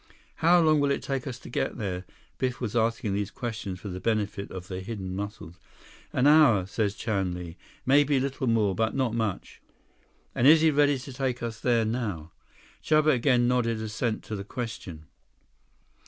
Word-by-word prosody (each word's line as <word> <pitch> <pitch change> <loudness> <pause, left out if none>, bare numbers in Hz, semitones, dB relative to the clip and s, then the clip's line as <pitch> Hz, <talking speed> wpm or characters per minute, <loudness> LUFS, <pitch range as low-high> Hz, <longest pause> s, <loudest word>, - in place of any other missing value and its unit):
"How 175 +2 +5
long 155 -2 +4
will 145 0 +2
it 140 - -1
take 135 -1 -3
us 130 -2 -5
to - - -13
get - - -2
there?" 95 -5 -4 0.3
Biff 125 -1 -1
was 120 -2 -4
asking 115 -3 0
these 100 0 -1
questions 110 -6 -5
for 100 - -7
the 90 0 -5
benefit 105 -1 -1
of 90 -1 -8
the 95 -2 -5
hidden 95 -2 -5
Muscles. 100 -4 -7 0.5
"An 130 - +1
hour, 145 -11 +6
says 100 +1 -1
Chan 95 -4 -1
Li. 85 -2 -7 0.3
Maybe 140 +1 +4
little 135 0 -2
more. 110 -4 +2
But 110 +2 -1
not 130 -4 0
much." 110 -4 -3 0.7
"And 125 - +3
is 155 +1 +8
he 160 -1 +5
ready 145 -1 +3
to 130 +1 -9
take 125 -2 -2
us 115 -2 -4
there 115 -2 +2
now?" 105 -9 -3 0.5
Chuba 155 0 +4
again 125 -1 +3
nodded 120 -2 +1
assent 110 +1 -2
to 110 - -5
the 100 - -5
question. 100 -8 -6
115 Hz, 180 wpm, -27 LUFS, 100-130 Hz, 0.7 s, is